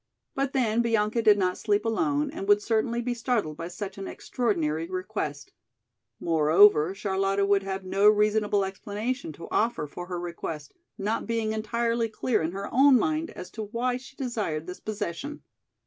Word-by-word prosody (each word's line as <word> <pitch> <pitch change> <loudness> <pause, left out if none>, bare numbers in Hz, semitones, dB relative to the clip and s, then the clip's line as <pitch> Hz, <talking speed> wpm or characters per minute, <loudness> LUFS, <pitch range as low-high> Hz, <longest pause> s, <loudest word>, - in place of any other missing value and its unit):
But 275 0 -1
then 235 -3 +2
Bianca 225 -1 +1
did 210 -2 +6
not 185 -2 0
sleep 210 0 +1
alone 290 +5 0
and 200 -11 -6
would 205 0 +6
certainly 230 +2 0
be 245 0 -1
startled 230 - -1
by 165 +2 -5
such 190 +2 -6
an 195 - -5
extraordinary 165 -9 -1
request. 185 -6 -4 0.7
Moreover, 165 +2 +5
Charlotta 195 0 0
would 200 0 +3
have 195 0 -4
no 200 +3 +5
reasonable 210 -1 +2
explanation 205 +3 -4
to 165 - -10
offer 225 -8 +1
for 175 +4 -8
her 180 -1 -4
request 165 -3 -6 0.2
not 210 +3 -2
being 225 -1 0
entirely 230 +1 0
clear 225 +2 0
in 160 +1 -1
her 195 +2 -5
own 270 +1 +7
mind 315 +6 0
as 180 - -9
to 220 -2 -5
why 245 +4 -1
she 260 +1 -13
desired 215 - -3
this 180 +1 -7
possession. 215 - -5
210 Hz, 165 wpm, -27 LUFS, 185-235 Hz, 0.7 s, own